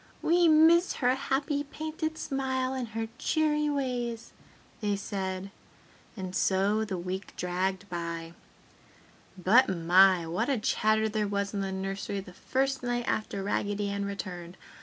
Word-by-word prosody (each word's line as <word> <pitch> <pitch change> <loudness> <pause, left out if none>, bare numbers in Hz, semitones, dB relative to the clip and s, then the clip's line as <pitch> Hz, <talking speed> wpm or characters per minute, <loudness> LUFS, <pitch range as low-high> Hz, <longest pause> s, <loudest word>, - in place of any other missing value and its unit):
"We 345 +1 +4
miss 325 +3 +6
her 250 -1 +2
happy 280 +2 -1
painted 315 +2 -4
smile 260 -2 -1
and 255 -2 -3
her 225 +1 -4
cheery 300 -1 +1
ways!" 245 -5 -2 0.5
they 205 -2 0
said. 195 -1 -4 0.7
And 185 -1 -5
so 195 +4 +2
the 200 -4 -3
week 185 +2 -5
dragged 185 +2 -1
by.... 170 -2 -5 1.0
But, 215 +9 +5
my! 180 0 +5
What 180 +10 -1
a 275 - +2
chatter 215 0 +2
there 215 -1 -1
was 200 0 -2
in 200 - -1
the 195 -1 -2
nursery 195 +1 -3
the 185 -2 -10
first 270 +7 -1
night 240 -1 -2
after 200 -2 -2
Raggedy 205 0 -1
Ann 200 0 -2
returned. 180 -3 -6
205 Hz, 140 wpm, -29 LUFS, 190-260 Hz, 1.0 s, miss